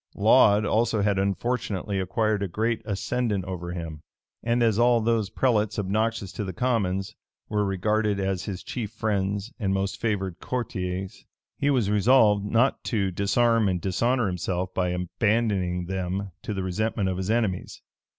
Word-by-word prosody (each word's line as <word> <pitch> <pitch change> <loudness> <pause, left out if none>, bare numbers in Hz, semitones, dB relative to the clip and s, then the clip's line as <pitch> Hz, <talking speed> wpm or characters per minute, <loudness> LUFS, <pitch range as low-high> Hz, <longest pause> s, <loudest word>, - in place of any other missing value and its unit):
Laud 105 -1 +5
also 110 -1 +1
had 100 -1 +2
unfortunately 100 0 -1
acquired 110 +2 0
a 100 - 0
great 110 +5 -1
ascendant 105 -1 -1
over 90 -2 -5
him; 80 -3 -6 0.4
and 120 +1 +1
as 110 -2 +2
all 120 0 +5
those 115 -2 +1
prelates 110 -5 +1
obnoxious 105 0 -1
to - - -4
the 95 -2 -5
commons, 100 -4 0 0.4
were 105 -1 +1
regarded 105 +1 0
as 95 -1 -1
his 95 -3 -5
chief 115 -5 -4
friends 100 +1 -2
and 95 -3 0
most 100 +2 -2
favored 95 -6 -1
courtiers, 95 -6 -4 0.4
he 145 - +2
was 120 -8 +2
resolved 105 -1 +4
not 115 +6 +1
to 100 -6 0
disarm 110 +3 +2
and 90 -1 0
dishonor 115 +7 +1
himself 90 0 -2
by 90 -1 0
abandoning 90 0 0
them 95 +1 -3
to 105 - -4
the 95 - -2
resentment 105 +2 -1
of 95 -1 -1
his 95 +1 -3
enemies. 110 -5 -1
100 Hz, 155 wpm, -26 LUFS, 95-115 Hz, 0.4 s, Laud